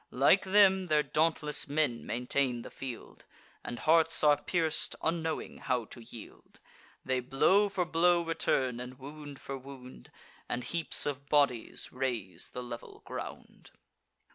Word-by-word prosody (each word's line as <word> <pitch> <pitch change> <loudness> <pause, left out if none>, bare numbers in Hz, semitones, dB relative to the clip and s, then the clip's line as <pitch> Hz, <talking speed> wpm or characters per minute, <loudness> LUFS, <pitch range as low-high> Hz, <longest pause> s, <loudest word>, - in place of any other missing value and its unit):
Like 140 +10 +4
them, 190 -1 +5
their 155 -3 +2
dauntless 155 -1 +1
men 145 -5 0
maintain 125 0 0
the - - -10
field; 130 -4 -8 0.4
And 120 - -6
hearts 160 +6 +4
are 150 -1 +7
pierc'd, 165 -3 0
unknowing 160 -1 -2
how 125 -3 -1
to 120 - -11
yield: 115 -1 -12 0.5
They 130 0 +1
blow 185 +11 +3
for 185 -2 -1
blow 170 +1 +3
return, 130 -6 0
and 125 +1 -8
wound 145 +1 -10
for 135 -1 -6
wound; 130 - -12 0.4
And 125 - -2
heaps 170 +3 -1
of 140 -1 -4
bodies 140 -6 +1
raise 125 -8 -3
the 125 - -6
level 120 -1 -9
ground. - - -8
140 Hz, 140 wpm, -31 LUFS, 125-165 Hz, 0.5 s, are